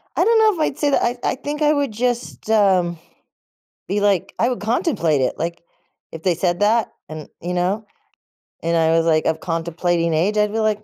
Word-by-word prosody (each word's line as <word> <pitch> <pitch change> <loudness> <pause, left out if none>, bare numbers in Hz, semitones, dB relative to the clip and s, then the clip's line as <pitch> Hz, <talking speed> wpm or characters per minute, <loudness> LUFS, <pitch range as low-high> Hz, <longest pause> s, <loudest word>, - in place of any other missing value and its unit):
I - - +3
don't 460 0 +4
know 435 -1 +5
if - - -8
I'd 270 - -5
say 290 -2 +1
that. - - +2
I 240 +1 0
I - - 0
think 290 +3 -5
I 300 0 +4
would 285 -4 0
just, 240 0 -3
um, 190 -5 +3 0.9
be 205 - 0
like 200 -4 +1
I 235 - +3
would 250 - -3
contemplate 220 - +1
it, 130 - -1
like, 170 +1 -3 0.5
if 160 - -8
they 180 -3 +2
said 175 0 0
that 220 +2 +2 0.2
and, 155 -1 -8
you 175 +2 -3
know, 190 +5 -1 0.8
and 170 +1 0
I 160 0 +3
was 165 - +2
like 155 -1 +2
of 160 - 0
contemplating 170 0 -1
age, 185 +7 +1
I'd 210 0 +2
be 225 - -2
like, 215 -1 0
205 Hz, 210 wpm, -20 LUFS, 170-240 Hz, 0.9 s, know